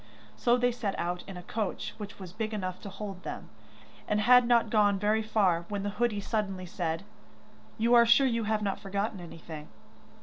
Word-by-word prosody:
So 240 Hz, -, +3 dB
they 245 Hz, 0 st, +2 dB
set 230 Hz, -5 st, -3 dB
out 175 Hz, +1 st, -2 dB
in 195 Hz, -2 st, -7 dB
a 180 Hz, -, -8 dB
coach 210 Hz, +1 st, -3 dB
which 205 Hz, -1 st, -7 dB
was 185 Hz, -2 st, -9 dB
big 220 Hz, 0 st, -3 dB
enough 185 Hz, -3 st, -4 dB
to 200 Hz, -, -7 dB
hold 195 Hz, -2 st, -7 dB
them, -, -, -7 dB, 0.6 s
and 210 Hz, -, +1 dB
had 250 Hz, +2 st, +6 dB
not 235 Hz, -2 st, +3 dB
gone 205 Hz, -2 st, +4 dB
very 210 Hz, +2 st, +2 dB
far 190 Hz, -6 st, +1 dB
when 200 Hz, -1 st, -3 dB
the 205 Hz, -, -2 dB
hoodie 230 Hz, -4 st, +2 dB
suddenly 195 Hz, -4 st, -2 dB
said: 170 Hz, -2 st, -3 dB, 0.7 s
'You 230 Hz, +2 st, +2 dB
are 235 Hz, -1 st, +7 dB
sure 255 Hz, +4 st, +6 dB
you 230 Hz, -3 st, 0 dB
have 215 Hz, 0 st, 0 dB
not 195 Hz, -2 st, -1 dB
forgotten 200 Hz, +1 st, -3 dB
anything? 160 Hz, -3 st, -9 dB
205 Hz, 195 wpm, -29 LUFS, 185-225 Hz, 0.7 s, are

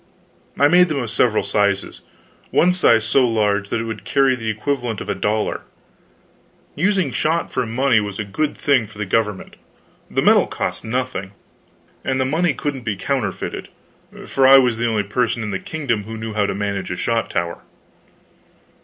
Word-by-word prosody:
I 145 Hz, -, +5 dB
made 180 Hz, +3 st, +5 dB
them 155 Hz, -, -1 dB
of 120 Hz, -5 st, -3 dB
several 110 Hz, -1 st, +2 dB
sizes 100 Hz, -2 st, 0 dB, 0.5 s
one 180 Hz, +2 st, +3 dB
size 115 Hz, -11 st, +4 dB
so 125 Hz, +2 st, +3 dB
large 105 Hz, -3 st, 0 dB
that -, -, -1 dB
it -, -, -2 dB
would 115 Hz, -1 st, -6 dB
carry 135 Hz, -2 st, +2 dB
the 115 Hz, -3 st, -4 dB
equivalent 120 Hz, 0 st, -2 dB
of -, -, -7 dB
a -, -, +1 dB
dollar. 105 Hz, +1 st, -1 dB, 1.1 s
Using 185 Hz, -3 st, +1 dB
shot 160 Hz, +6 st, -1 dB
for 125 Hz, -2 st, -1 dB
money 120 Hz, 0 st, +2 dB
was 105 Hz, -2 st, -4 dB
a 110 Hz, -, -2 dB
good 145 Hz, +10 st, -2 dB
thing 130 Hz, -6 st, +2 dB
for 105 Hz, -, -16 dB
the 105 Hz, -, -3 dB
government; 105 Hz, -1 st, -1 dB, 0.5 s
the -, -, 0 dB
metal -, -, +5 dB
cost -, -, -4 dB
nothing, 110 Hz, -5 st, -3 dB, 0.7 s
and 130 Hz, 0 st, -1 dB
the 130 Hz, -, +1 dB
money 165 Hz, +6 st, +1 dB
couldn't 145 Hz, -3 st, -3 dB
be 110 Hz, -4 st, -2 dB
counterfeited, 105 Hz, -2 st, -3 dB, 0.6 s
for 135 Hz, -1 st, +3 dB
I 135 Hz, +1 st, +9 dB
was 125 Hz, -4 st, +3 dB
the 120 Hz, +1 st, 0 dB
only 110 Hz, -3 st, 0 dB
person 115 Hz, +3 st, -1 dB
in 105 Hz, -, -4 dB
the 95 Hz, -, -2 dB
kingdom 125 Hz, -9 st, -3 dB
who 110 Hz, +1 st, -7 dB
knew 110 Hz, 0 st, -5 dB
how 105 Hz, -1 st, +1 dB
to 100 Hz, -, -2 dB
manage 100 Hz, -1 st, -3 dB
a 90 Hz, -, -4 dB
shot 115 Hz, +3 st, -1 dB
tower. 85 Hz, 0 st, -2 dB
115 Hz, 180 wpm, -20 LUFS, 105-135 Hz, 1.1 s, I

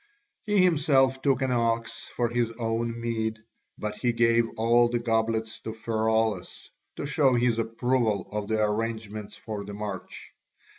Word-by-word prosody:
He 205 Hz, -3 st, +4 dB
himself 135 Hz, -6 st, +3 dB
took 135 Hz, -2 st, +2 dB
an 130 Hz, -, 0 dB
ox 115 Hz, -1 st, -1 dB
for 120 Hz, -, +1 dB
his 120 Hz, -1 st, 0 dB
own 115 Hz, 0 st, -2 dB
meed, 110 Hz, -1 st, -2 dB, 0.4 s
but 105 Hz, 0 st, -4 dB
he 120 Hz, -2 st, +1 dB
gave 115 Hz, 0 st, +3 dB
all 120 Hz, +2 st, +4 dB
the 120 Hz, -, 0 dB
goblets 110 Hz, -1 st, 0 dB
to 110 Hz, -, -6 dB
Pheraulas 110 Hz, -3 st, -1 dB, 0.2 s
to -, -, -4 dB
show 140 Hz, -3 st, +3 dB
his 120 Hz, -1 st, +2 dB
approval 115 Hz, -1 st, 0 dB
of 105 Hz, -1 st, -3 dB
the 110 Hz, 0 st, +1 dB
arrangements 110 Hz, -1 st, -3 dB
for 105 Hz, -2 st, -6 dB
the 100 Hz, 0 st, -7 dB
march. 100 Hz, -3 st, -7 dB
115 Hz, 150 wpm, -27 LUFS, 110-120 Hz, 0.4 s, He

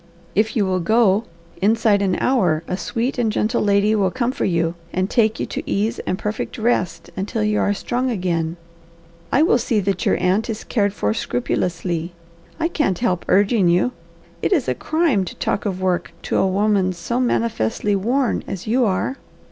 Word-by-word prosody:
"If 215 Hz, +2 st, +1 dB
you 210 Hz, -4 st, +2 dB
will 185 Hz, -1 st, 0 dB
go, 215 Hz, +2 st, +3 dB, 0.4 s
inside 215 Hz, 0 st, +3 dB
an 185 Hz, -3 st, +1 dB
hour 180 Hz, -12 st, +2 dB
a 180 Hz, -, -1 dB
sweet 240 Hz, +6 st, -2 dB
and 225 Hz, -3 st, +2 dB
gentle 220 Hz, +3 st, 0 dB
lady 205 Hz, +1 st, +3 dB
will 200 Hz, -3 st, +2 dB
come 240 Hz, +4 st, -1 dB
for -, -, -2 dB
you 170 Hz, -2 st, +1 dB, 0.2 s
and 185 Hz, +1 st, 0 dB
take 220 Hz, 0 st, +2 dB
you -, -, -1 dB
to -, -, -4 dB
ease 210 Hz, +3 st, 0 dB
and 185 Hz, -, 0 dB
perfect 210 Hz, +1 st, -4 dB
rest 185 Hz, -8 st, -1 dB
until 210 Hz, +3 st, -2 dB
you 210 Hz, 0 st, +1 dB
are -, -, +2 dB
strong 250 Hz, +5 st, -1 dB
again. 175 Hz, -6 st, -1 dB, 0.7 s
I 285 Hz, -, +4 dB
will 285 Hz, -7 st, +4 dB
see 230 Hz, -2 st, +1 dB
that 195 Hz, -1 st, -1 dB
your -, -, +2 dB
aunt 190 Hz, +6 st, +1 dB
is 220 Hz, -1 st, -4 dB
cared 205 Hz, -3 st, 0 dB
for 105 Hz, -, 0 dB
scrupulously. 170 Hz, -, -2 dB, 0.5 s
I 330 Hz, -, +2 dB
can't 295 Hz, -, 0 dB
help 185 Hz, -6 st, -1 dB
urging 200 Hz, -1 st, +3 dB
you. 180 Hz, +8 st, +2 dB, 0.5 s
It -, -, 0 dB
is 310 Hz, -10 st, +2 dB
a -, -, +2 dB
crime 315 Hz, -, +1 dB
to 180 Hz, -, -7 dB
talk 200 Hz, -, -1 dB
of 190 Hz, -2 st, -3 dB
work 185 Hz, -2 st, -1 dB
to -, -, -1 dB
a -, -, +3 dB
woman 195 Hz, -1 st, +2 dB
so 180 Hz, +8 st, -3 dB
manifestly 210 Hz, -, 0 dB
worn 240 Hz, +6 st, 0 dB
as 195 Hz, -2 st, -5 dB
you 240 Hz, +3 st, +2 dB
are." 215 Hz, +7 st, -1 dB
205 Hz, 190 wpm, -21 LUFS, 185-230 Hz, 0.7 s, I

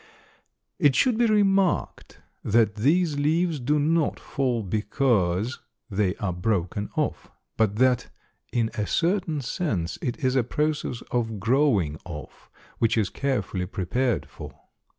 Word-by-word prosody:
It 145 Hz, -3 st, +4 dB
should 250 Hz, -3 st, +3 dB
be 235 Hz, +1 st, +3 dB
remarked 195 Hz, -3 st, +1 dB, 0.2 s
that 110 Hz, -1 st, +3 dB
these 150 Hz, -, +2 dB
leaves 160 Hz, +2 st, +1 dB
do 145 Hz, +5 st, +1 dB
not 155 Hz, +1 st, +1 dB
fall 125 Hz, -4 st, -1 dB
because 105 Hz, 0 st, 0 dB, 0.3 s
they 100 Hz, -1 st, +1 dB
are 95 Hz, -3 st, -2 dB
broken 95 Hz, +1 st, -1 dB
off, -, -, -2 dB, 0.3 s
but 105 Hz, -2 st, +1 dB
that 125 Hz, +1 st, +2 dB, 0.4 s
in 115 Hz, -2 st, 0 dB
a 105 Hz, -1 st, -2 dB
certain 170 Hz, -3 st, 0 dB
sense 115 Hz, -, -2 dB
it 125 Hz, +5 st, -4 dB
is 130 Hz, 0 st, +2 dB
a 130 Hz, -, +3 dB
process 150 Hz, -1 st, -2 dB
of 115 Hz, -3 st, -1 dB
growing 110 Hz, -, +2 dB
off, 75 Hz, -5 st, -10 dB, 0.3 s
which 115 Hz, 0 st, +2 dB
is 105 Hz, -4 st, +1 dB
carefully 105 Hz, -9 st, -2 dB
prepared 115 Hz, +7 st, -1 dB
for. -, -, -10 dB
120 Hz, 130 wpm, -25 LUFS, 105-150 Hz, 0.4 s, It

